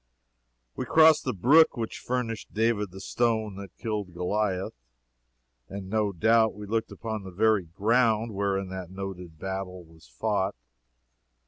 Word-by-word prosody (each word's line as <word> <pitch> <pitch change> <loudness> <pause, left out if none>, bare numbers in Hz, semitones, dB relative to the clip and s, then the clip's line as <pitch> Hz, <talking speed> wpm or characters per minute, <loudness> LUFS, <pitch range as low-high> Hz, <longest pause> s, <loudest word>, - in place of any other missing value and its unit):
We - - -3
crossed 160 -1 +6
the - - +1
brook 140 - +5
which 115 -1 -4
furnished 120 -3 -3
David 110 -2 +1
the 95 +2 -11
stone 110 -2 0
that 100 -1 -10
killed 105 -6 -4
Goliah, 95 +1 -1 1.0
and 95 -1 -7
no 105 -2 +1
doubt 110 +4 +3
we 105 0 -8
looked 110 +2 -2
upon 110 -2 -5
the 95 - -8
very 105 +1 +2
ground 110 +5 +1
whereon 100 -1 -1
that 95 -2 -6
noted 95 -3 -7
battle 95 0 -5
was 80 -3 -19
fought. - - -1
105 Hz, 140 wpm, -27 LUFS, 95-115 Hz, 1.0 s, crossed